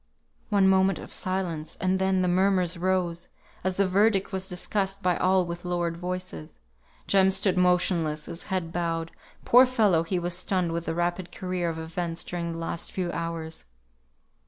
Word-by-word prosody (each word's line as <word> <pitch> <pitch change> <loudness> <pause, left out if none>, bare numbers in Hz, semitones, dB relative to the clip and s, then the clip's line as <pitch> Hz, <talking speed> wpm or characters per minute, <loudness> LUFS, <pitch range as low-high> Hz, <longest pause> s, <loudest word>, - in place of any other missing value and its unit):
One 200 -3 +4
moment 190 -1 +4
of - - -8
silence, 180 -5 -2
and 190 0 +1
then 190 -1 +2
the - - +1
murmurs 185 -1 +2
rose, 175 -1 -1 0.4
as 185 0 -1
the 195 -1 +3
verdict 195 +1 +2
was 190 0 -3
discussed 195 +2 -2
by 180 -1 +3
all 185 +1 +3
with 170 0 -6
lowered 175 -1 -1
voice. 180 - -6 0.5
Jem 190 -1 +4
stood 190 0 +1
motionless, 180 -4 +2
his 170 - -8
head 180 -3 -2
bowed; 165 -1 -2 0.3
poor 250 +2 +7
fellow, 215 -10 +3
he 170 +3 -2
was 175 0 -2
stunned 185 -1 0
with 170 0 -3
the 165 - -2
rapid 175 +1 -1
career 180 -2 -2
of 165 - -4
events 165 +1 -3
during 170 -1 -4
the - - -6
last 165 0 -4
few 180 -2 -2
hours. 165 -1 -5
180 Hz, 170 wpm, -27 LUFS, 170-190 Hz, 0.5 s, poor